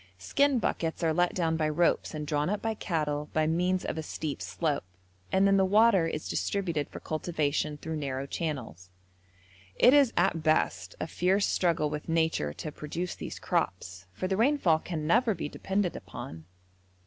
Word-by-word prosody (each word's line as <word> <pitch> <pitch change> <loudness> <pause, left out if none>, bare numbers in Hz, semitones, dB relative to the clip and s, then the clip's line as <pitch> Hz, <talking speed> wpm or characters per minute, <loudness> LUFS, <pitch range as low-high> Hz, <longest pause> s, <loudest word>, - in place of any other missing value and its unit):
Skin 275 - +2
buckets 165 -7 -1
are 160 -1 +2
let 175 +2 +1
down 165 -3 +1
by 155 -1 +1
ropes 170 +1 +1
and 150 -1 -4
drawn 150 +2 0
up 210 +1 0
by 225 0 -1
cattle 150 -7 -2
by 155 0 +2
means 180 +3 +1
of 160 - -3
a - - -1
steep 155 -1 -5
slope, 150 -4 -1 0.5
and 190 +1 +4
then 195 0 +5
the 190 - +4
water 200 -2 +4
is 155 -1 -4
distributed 170 -7 -1
for - - -8
cultivation 155 -2 -1
through 160 +2 -5
narrow 135 -2 -3
channels; 130 - -5 0.9
it 250 - +6
is 280 -5 +6
at 175 -2 +2
best 155 0 +1
a - - -2
fierce 185 +5 +1
struggle 165 -4 +1
with 150 +2 -5
nature 160 - +1
to 150 - -6
produce 165 +4 -4
these - - -7
crops, 90 +1 -2
for 105 - -3
the 190 0 0
rainfall 225 - +3
can 160 -2 -4
never 225 +5 +3
be 165 - -4
depended 190 +3 -1
upon. 80 0 -8
160 Hz, 175 wpm, -29 LUFS, 150-190 Hz, 0.9 s, it